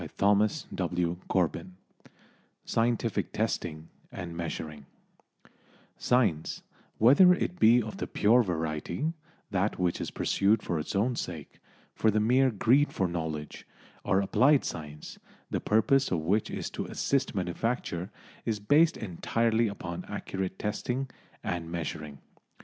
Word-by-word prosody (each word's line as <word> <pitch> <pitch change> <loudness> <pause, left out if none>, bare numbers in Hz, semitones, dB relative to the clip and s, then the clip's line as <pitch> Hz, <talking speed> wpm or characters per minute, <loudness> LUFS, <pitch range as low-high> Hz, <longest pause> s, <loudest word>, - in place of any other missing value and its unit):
CHAPTER 100 +1 +5 0.3
XV 85 -1 -1 1.0
SCIENTIFIC 115 -1 0
TESTING 80 +1 -2 0.2
AND 85 -3 -6
MEASURING 80 -4 -5 1.1
Science, 115 -11 +1 0.3
whether 145 - +7
it 180 0 -3
be 120 0 +6
of 110 - -7
the - - -3
pure 115 +4 +4
variety, 85 - -2 0.4
that 100 +1 0
which 90 -2 0
is - - -3
pursued 105 +2 +1
for 85 - -1
its 75 - -5
own 120 +5 +1
sake 80 -9 -6 0.3
for 110 - +2
the 110 0 +2
mere 125 +5 +4
greed 125 +6 +3
for 95 - 0
knowledge 80 -3 -5 0.4
or 95 - +2
applied 135 +8 +4
science, 75 -1 -7 0.3
the - - -1
purpose 135 +6 +3
of 85 -4 0
which 100 +7 +1
is - - -4
to - - -4
assist 135 -4 -1
manufacture, 95 -1 -2 0.3
is 110 -2 -1
based 150 +10 +4
entirely 115 +4 0
upon 90 -3 -5
accurate 95 -1 -4
testing 125 +5 -3 0.3
and 85 -1 -3
measuring. 80 -3 -5
100 Hz, 125 wpm, -29 LUFS, 85-115 Hz, 1.1 s, whether